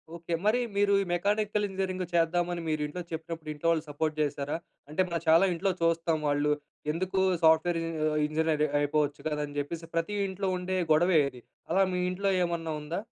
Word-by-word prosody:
Okay. 170 Hz, 0 st, -5 dB
మరి, 220 Hz, +4 st, +4 dB, 0.2 s
మీరు 200 Hz, 0 st, +3 dB
ఈ -, -, -7 dB
మెకానికల్ 210 Hz, +3 st, +1 dB
ఇంజినీరింగ్ 190 Hz, -1 st, -2 dB
చేద్దామని 175 Hz, +1 st, +1 dB
మీరు 155 Hz, -1 st, 0 dB
ఇంట్లో 150 Hz, +5 st, -5 dB
చెప్పినప్పుడు 160 Hz, -1 st, -6 dB
ఇంట్లో 150 Hz, +3 st, -3 dB
వాళ్ళు 160 Hz, -2 st, +1 dB
సపోర్ట్ 155 Hz, +2 st, -1 dB
చేసారా? 145 Hz, -1 st, -1 dB, 0.3 s
అంటే 155 Hz, +5 st, 0 dB
మనం 170 Hz, -2 st, -2 dB
చాలా 165 Hz, +4 st, +6 dB
ఇంట్లో 190 Hz, +3 st, 0 dB
చూస్తాం. 165 Hz, -1 st, +2 dB
వాళ్ళు 145 Hz, +1 st, +2 dB, 0.4 s
ఎందుకు 185 Hz, +4 st, -1 dB, 0.2 s
సాఫ్ట్‌వేర్ 160 Hz, +2 st, +4 dB, 0.5 s
ఇంజినీర్ 155 Hz, 0 st, +1 dB, 0.2 s
అయిపోవచ్చు 145 Hz, 0 st, 0 dB
కదా! 150 Hz, -1 st, -2 dB
అని 145 Hz, 0 st, -11 dB
చెప్పేసి 165 Hz, +3 st, -5 dB
ప్రతి 165 Hz, +5 st, 0 dB
ఇంట్లో 190 Hz, 0 st, -2 dB
ఉండే 185 Hz, +1 st, -2 dB, 0.2 s
గొడవే 170 Hz, +1 st, +4 dB
ఇది. 125 Hz, -2 st, -14 dB, 0.3 s
అలా 185 Hz, +4 st, +3 dB
మీ 180 Hz, -, 0 dB
ఇంట్లో 195 Hz, +2 st, 0 dB
ఏమన్నా 165 Hz, -2 st, -2 dB
ఉందా? 160 Hz, +5 st, -3 dB
165 Hz, 170 wpm, -29 LUFS, 155-185 Hz, 0.5 s, చాలా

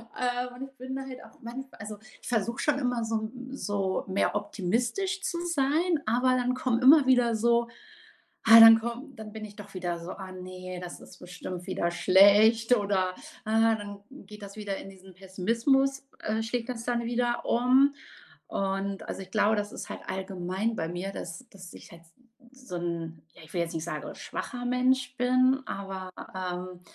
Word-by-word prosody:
äh, 245 Hz, 0 st, -1 dB
und 250 Hz, +2 st, -7 dB
ich 270 Hz, -, -9 dB
bin 260 Hz, +1 st, -6 dB
da 270 Hz, -, -4 dB
halt 260 Hz, -1 st, -9 dB
auch 225 Hz, -, -17 dB
manchmal 260 Hz, +3 st, -8 dB
also, 210 Hz, 0 st, -7 dB, 0.2 s
ich -, -, -11 dB
versuche 235 Hz, +2 st, -1 dB
schon 280 Hz, 0 st, +1 dB
immer 245 Hz, -3 st, 0 dB
so 225 Hz, 0 st, -1 dB
'n 250 Hz, +4 st, -6 dB
so 200 Hz, -6 st, -1 dB
mehr 195 Hz, +2 st, 0 dB
optimistisch 235 Hz, -, -1 dB
zu 350 Hz, -, -2 dB
sein, 320 Hz, +1 st, +1 dB
aber 245 Hz, +4 st, +2 dB
dann 250 Hz, 0 st, +1 dB
kommen 255 Hz, -2 st, 0 dB
immer 280 Hz, +2 st, +8 dB
wieder 245 Hz, -3 st, +4 dB
so 235 Hz, +1 st, +2 dB, 0.8 s
ah, 225 Hz, 0 st, +12 dB
dann 225 Hz, 0 st, +10 dB
kommen 235 Hz, +5 st, -6 dB
dann 215 Hz, -1 st, -9 dB
bin 220 Hz, -1 st, -7 dB
ich 205 Hz, -1 st, -12 dB
doch 205 Hz, -1 st, -11 dB
wieder 175 Hz, -2 st, -2 dB
so: 170 Hz, +2 st, -7 dB
„Ah 190 Hz, -1 st, -9 dB
ne, 185 Hz, 0 st, -7 dB
das 180 Hz, -1 st, -8 dB
ist -, -, -14 dB
bestimmt 180 Hz, 0 st, -7 dB
wieder 175 Hz, -2 st, -1 dB
schlecht" 205 Hz, +6 st, +6 dB
oder, 200 Hz, -3 st, +1 dB, 0.4 s
äh 215 Hz, -, -3 dB, 0.3 s
dann 205 Hz, -1 st, -8 dB
geht 210 Hz, -6 st, -12 dB
das 200 Hz, 0 st, -9 dB
wieder 205 Hz, -2 st, -3 dB
in -, -, -9 dB
diesen 190 Hz, -1 st, -15 dB
Pessimismus, 235 Hz, +9 st, 0 dB
äh, 220 Hz, +1 st, -1 dB
schlägt 235 Hz, +1 st, -3 dB
das 230 Hz, -2 st, -5 dB
dann 240 Hz, -1 st, 0 dB
wieder 240 Hz, 0 st, 0 dB
um. 260 Hz, +4 st, +4 dB, 0.6 s
Und 195 Hz, 0 st, -2 dB
also, -, -, -4 dB
ich 185 Hz, -, -12 dB
glaube, 215 Hz, 0 st, +3 dB
das 205 Hz, 0 st, -2 dB
ist -, -, -7 dB
halt -, -, -6 dB
allgemein 190 Hz, +3 st, -2 dB
bei 160 Hz, -, -2 dB
mir, 180 Hz, +3 st, -4 dB
dass 180 Hz, +7 st, -7 dB
dass 185 Hz, -3 st, -12 dB
ich -, -, -13 dB
halt 170 Hz, 0 st, -13 dB, 0.5 s
so 255 Hz, -7 st, -11 dB
'n 165 Hz, -2 st, -4 dB
ja -, -, -15 dB
ich 160 Hz, -, -16 dB
will 175 Hz, -, 0 dB
jetzt 165 Hz, -, -5 dB
nicht 160 Hz, -1 st, -3 dB
sagen, 170 Hz, -, -5 dB
schwacher 245 Hz, -2 st, -5 dB
Mensch 250 Hz, 0 st, +1 dB
bin, 255 Hz, +2 st, +3 dB
aber, 190 Hz, -1 st, -5 dB, 0.2 s
ähm, 180 Hz, -1 st, -5 dB
220 Hz, 185 wpm, -28 LUFS, 190-250 Hz, 0.8 s, ah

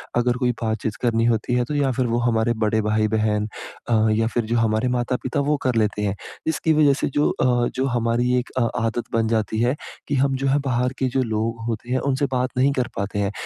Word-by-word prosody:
अगर 120 Hz, 0 st, +2 dB
कोई 125 Hz, -1 st, +1 dB
बातचीत 110 Hz, -1 st, -2 dB
करनी 115 Hz, -2 st, +2 dB
होती 120 Hz, +1 st, +1 dB
है 125 Hz, -, +2 dB
तो 150 Hz, -, -4 dB
या 140 Hz, -2 st, +2 dB
फिर 130 Hz, +1 st, 0 dB
वो 115 Hz, -, 0 dB
हमारे 120 Hz, -1 st, +1 dB
बड़े 110 Hz, +1 st, +1 dB
भाई-बहन 110 Hz, 0 st, +1 dB, 0.4 s
अ, 110 Hz, -1 st, +3 dB
या 110 Hz, +1 st, +2 dB
फिर 120 Hz, +1 st, -1 dB
जो 120 Hz, +2 st, 0 dB
हमारे 110 Hz, +2 st, +1 dB
माता-पिता 125 Hz, +2 st, -2 dB
वो 145 Hz, +1 st, +1 dB
कर 130 Hz, -2 st, +1 dB
लेते 105 Hz, -2 st, +1 dB
हैं। 100 Hz, -1 st, -1 dB, 0.3 s
इसकी 160 Hz, 0 st, +1 dB
वजह 150 Hz, -2 st, +5 dB
से 140 Hz, -, -1 dB
जो 150 Hz, -, +3 dB
अ, 120 Hz, -1 st, +1 dB
जो 130 Hz, -, 0 dB
हमारी 120 Hz, 0 st, +1 dB
एक 125 Hz, -, -6 dB
अ, -, -, +3 dB, 0.2 s
आदत 115 Hz, +1 st, -1 dB
बन 115 Hz, -1 st, +2 dB
जाती 110 Hz, -1 st, 0 dB
है, 125 Hz, +3 st, +2 dB, 0.3 s
कि 145 Hz, -, 0 dB
हम 135 Hz, 0 st, +2 dB
जो 135 Hz, +1 st, -1 dB
है 140 Hz, +2 st, +3 dB
बाहर 125 Hz, 0 st, 0 dB
के 130 Hz, -, +1 dB
जो 130 Hz, +1 st, 0 dB
लोग 115 Hz, 0 st, -2 dB
होते 115 Hz, +1 st, -4 dB
हैं 130 Hz, -, +2 dB
उनसे 135 Hz, +2 st, +1 dB
बात 130 Hz, 0 st, 0 dB
नहीं 135 Hz, +2 st, +4 dB
कर 125 Hz, -3 st, 0 dB
पाते 100 Hz, +1 st, -3 dB
हैं। 100 Hz, -1 st, 0 dB
120 Hz, 230 wpm, -22 LUFS, 110-130 Hz, 0.4 s, वजह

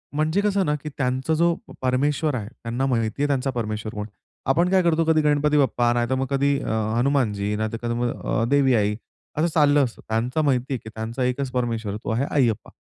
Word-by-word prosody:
म्हणजे 155 Hz, +6 st, +1 dB
कसं 200 Hz, -2 st, +1 dB
ना, 150 Hz, -, +1 dB
की 150 Hz, +1 st, -6 dB
त्यांचा 130 Hz, +3 st, 0 dB
जो 170 Hz, +2 st, +3 dB
प -, -, -13 dB
परमेश्वर 140 Hz, +3 st, +1 dB
आहे, 105 Hz, -5 st, -4 dB, 0.2 s
त्यांना 120 Hz, +3 st, -1 dB
माहिती 115 Hz, -1 st, -1 dB
आहे 145 Hz, -, +3 dB
त्यांचा 135 Hz, -1 st, 0 dB
परमेश्वर 110 Hz, -3 st, -3 dB
कोण 105 Hz, -, -4 dB
आहे? 105 Hz, -, -29 dB, 0.3 s
आपण 170 Hz, +6 st, +3 dB
काय 190 Hz, 0 st, +4 dB
करतो, 165 Hz, -1 st, +3 dB
कधी 160 Hz, -1 st, +3 dB
गणपती 150 Hz, 0 st, +2 dB
बाप्पा, 120 Hz, -3 st, +2 dB
नाहीतर 120 Hz, +2 st, 0 dB
मग 130 Hz, +1 st, -1 dB
कधी 140 Hz, 0 st, +2 dB
अ, -, -, -4 dB, 0.3 s
हनुमानजी, 115 Hz, -6 st, +1 dB
नाहीतर 110 Hz, +1 st, -2 dB
कधी 120 Hz, 0 st, -2 dB
मग 120 Hz, 0 st, 0 dB
अ, 115 Hz, -, 0 dB
देवी 135 Hz, -2 st, +4 dB
आई, 105 Hz, -1 st, +1 dB, 0.4 s
असं 155 Hz, +3 st, +2 dB
चाललं 145 Hz, -2 st, +4 dB
असतं. 120 Hz, -3 st, -5 dB
त्यांचं 120 Hz, +6 st, 0 dB
माहिती 130 Hz, -1 st, +1 dB
आहे, -, -, 0 dB
की 110 Hz, -, -8 dB
त्यांचा 115 Hz, +3 st, -3 dB
एकच 125 Hz, +1 st, -1 dB
परमेश्वर 115 Hz, -4 st, -2 dB
आहे, 105 Hz, -, -5 dB
तो -, -, -4 dB
आहे 120 Hz, +5 st, 0 dB
अय्यप्पा. 120 Hz, -7 st, +1 dB
130 Hz, 220 wpm, -23 LUFS, 115-145 Hz, 0.4 s, काय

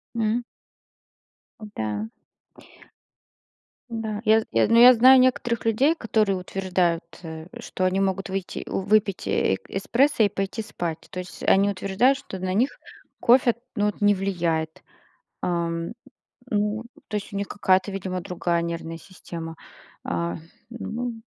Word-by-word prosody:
М. 225 Hz, +1 st, 0 dB, 1.2 s
О -, -, -6 dB
да. 110 Hz, 0 st, -3 dB, 1.8 s
Да, 220 Hz, -2 st, -4 dB
я 220 Hz, +1 st, +5 dB
я -, -, +3 dB
знаю, -, -, -7 dB
ну, 230 Hz, +1 st, +6 dB
я 250 Hz, +1 st, +10 dB
знаю 255 Hz, +3 st, +7 dB
некоторых 245 Hz, -2 st, +1 dB
людей, 260 Hz, +8 st, +3 dB
которые 215 Hz, -, +1 dB
утверждают, 180 Hz, -2 st, 0 dB, 0.2 s
э, 160 Hz, 0 st, -8 dB
что 185 Hz, -, -4 dB
они 185 Hz, +1 st, +1 dB
могут 195 Hz, 0 st, -1 dB
выйти 190 Hz, -1 st, -4 dB
у -, -, -1 dB
выпить 205 Hz, 0 st, +1 dB
э 95 Hz, -, +2 dB
эспрессо 235 Hz, +6 st, +2 dB
и 205 Hz, -, +4 dB
пойти 195 Hz, +2 st, -3 dB
спать, 170 Hz, -6 st, -5 dB
то 185 Hz, -, -6 dB
есть 180 Hz, -, -8 dB
они 200 Hz, +1 st, +4 dB
утверждают, 200 Hz, +7 st, +2 dB
что 190 Hz, -8 st, -8 dB
на 185 Hz, 0 st, -2 dB
них 240 Hz, +8 st, +3 dB, 0.5 s
кофе, 240 Hz, -1 st, +4 dB, 0.2 s
ну, 205 Hz, -2 st, +1 dB
вот 210 Hz, -, -4 dB
не 205 Hz, 0 st, +5 dB
влияет, 170 Hz, -5 st, -2 dB, 0.6 s
Ам, 170 Hz, 0 st, -1 dB, 0.6 s
ну, 210 Hz, +1 st, 0 dB, 0.2 s
то 210 Hz, -, -2 dB
есть 205 Hz, -, -5 dB
у -, -, -4 dB
них 200 Hz, 0 st, -2 dB
какая-то 190 Hz, -1 st, +2 dB
видимо 185 Hz, -1 st, -4 dB
другая 175 Hz, -2 st, -1 dB
нервная 165 Hz, -1 st, -4 dB
система. 165 Hz, -2 st, -9 dB, 0.5 s
А, 85 Hz, 0 st, -2 dB, 0.3 s
ну. 235 Hz, 0 st, -5 dB
195 Hz, 145 wpm, -24 LUFS, 175-225 Hz, 1.8 s, я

